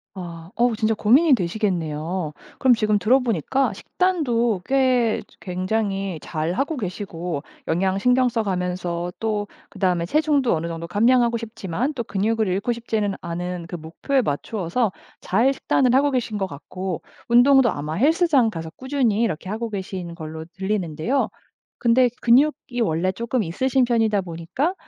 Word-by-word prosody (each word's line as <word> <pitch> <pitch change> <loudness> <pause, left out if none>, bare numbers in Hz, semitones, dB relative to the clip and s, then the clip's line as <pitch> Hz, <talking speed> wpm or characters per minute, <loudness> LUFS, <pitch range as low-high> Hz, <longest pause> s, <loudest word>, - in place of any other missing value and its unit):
아. 170 -1 -8
어 240 -1 +2
진짜 220 0 +1
고민이 265 +9 +5
되시겠네요. 170 -5 -1 0.3
그럼 255 -2 +5
지금 215 -2 +1
들어 255 +6 +4
보니까 250 - 0
식단도 240 - 0
꽤 255 -4 +2 0.2
굉장히 195 -1 -2
잘 160 +2 -2
하고 280 - -1
계시고 175 - -4 0.3
영양 190 +3 +1
신경 250 +3 +3
써 230 -1 -1
가면서 180 -2 -2
또 210 -2 -1 0.2
그다음에 180 -3 0
체중도 290 - +2
어느 165 +2 -3
정도 165 0 -5
감량하고 235 +4 +3
싶지만 225 - -3
또 235 - -2
근육을 215 +1 0
잃고 200 +6 0
싶지는 220 -4 -2
않은 175 0 -4
그 175 - -6
목표에 170 - -1
맞추어서 195 - -1 0.3
잘 230 +8 +2
식단을 255 -2 +2
하고 285 +1 +4
계신 235 -4 -1
것 195 - 0
같고 185 +3 -5 0.3
운동도 245 +1 +6
아마 150 +2 -4
헬스장 285 - +3
가서 165 -2 -6
꾸준히 255 -5 0
이렇게 185 -3 -2
하고 225 +2 -3
계신 185 -3 -5
걸로 160 -1 -7
들리는데요. 190 - -1 0.5
근데 245 +1 +4
근육이 250 0 +3
원래 170 +1 +1
조금 235 +3 -1
있으신 255 +9 +1
편이다 225 -4 +2
보니까 180 - -2
210 Hz, 330 characters per minute, -23 LUFS, 175-245 Hz, 0.5 s, 운동도